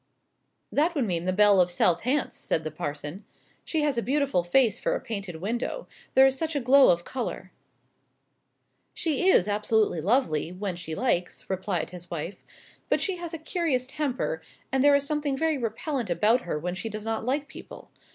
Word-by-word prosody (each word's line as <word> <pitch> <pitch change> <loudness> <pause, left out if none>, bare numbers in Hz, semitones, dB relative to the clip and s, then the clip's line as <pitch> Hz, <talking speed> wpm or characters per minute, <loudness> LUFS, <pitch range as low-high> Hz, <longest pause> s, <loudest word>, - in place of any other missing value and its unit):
"That 325 +4 +2
would 275 -5 +1
mean 175 -4 -2
the 185 - +1
belle 200 0 +5
of 180 - +2
South 175 -1 +2
Hants," 265 +4 0
said 160 - -2
the 155 - -4
parson. 150 +4 -5 0.4
"She 315 -2 -1
has 285 -5 +1
a - - -1
beautiful 275 -7 +1
face 220 +4 +3
for - - 0
a - - -2
painted 200 -7 -5
window 235 - -3 0.3
there 265 - +8
is 265 0 +3
such 320 +2 -2
a - - +2
glow 270 +2 +6
of 175 0 +3
colour." 250 +4 -5 1.4
"She 330 +2 0
is 195 - +5
absolutely 210 -3 +1
lovely, 170 - +1
when 185 0 -4
she 165 -2 -6
likes," 180 -7 -1
replied 190 -3 -2
his 175 -1 -9
wife; 170 +3 -5 0.5
"but - - +3
she 385 -3 -1
has 345 -2 -6
a 330 - -4
curious 315 -5 -1
temper; 290 - -2 0.3
and 265 0 +2
there 285 0 +6
is 280 0 +1
something 290 -2 -1
very 315 -1 +1
repellent 240 - -3
about 215 +8 +3
her 170 - -3
when 175 +4 -3
she 205 +5 -4
does 215 0 -6
not 225 0 -2
like 280 +4 -1
people. - - -12
230 Hz, 190 wpm, -27 LUFS, 180-285 Hz, 1.4 s, there